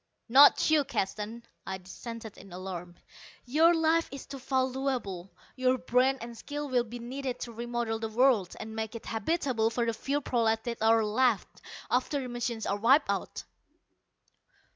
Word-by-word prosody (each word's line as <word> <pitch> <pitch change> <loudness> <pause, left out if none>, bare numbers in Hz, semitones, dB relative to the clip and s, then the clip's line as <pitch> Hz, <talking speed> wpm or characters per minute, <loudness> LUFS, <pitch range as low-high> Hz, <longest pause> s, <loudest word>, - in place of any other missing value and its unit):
"Not 280 +5 +7
you, 305 -2 +5
Keston," 215 0 -3 0.2
I 190 0 -4
dissented 220 +4 -9
in 195 - -14
alarm. 180 -1 -7 0.5
"Your 315 +7 +5
life 325 +1 +2
is 275 -1 -8
too 275 - -8
valuable. 260 -8 -2 0.2
Your 255 0 +2
brain 255 +2 +2
and 235 0 -7
skill 290 +5 -5
will 250 -2 +2
be 235 +2 -8
needed 250 +1 -5
to 240 - -5
remodel 235 -1 -3
the 225 -1 -3
world 225 -5 +3
and 220 0 -7
make 220 +1 -4
it 230 - -8
habitable 230 -1 0
for 235 +1 -1
the 230 - 0
few 275 +6 -1
prolats 225 -5 +1
that 235 -2 -5
are 225 0 +4
left, 225 +1 +1 0.3
after 260 +3 +1
the 255 -2 -5
machines 240 -2 -3
are 200 - 0
wiped 255 +8 +4
out." - - -4
240 Hz, 165 wpm, -29 LUFS, 220-265 Hz, 0.5 s, Not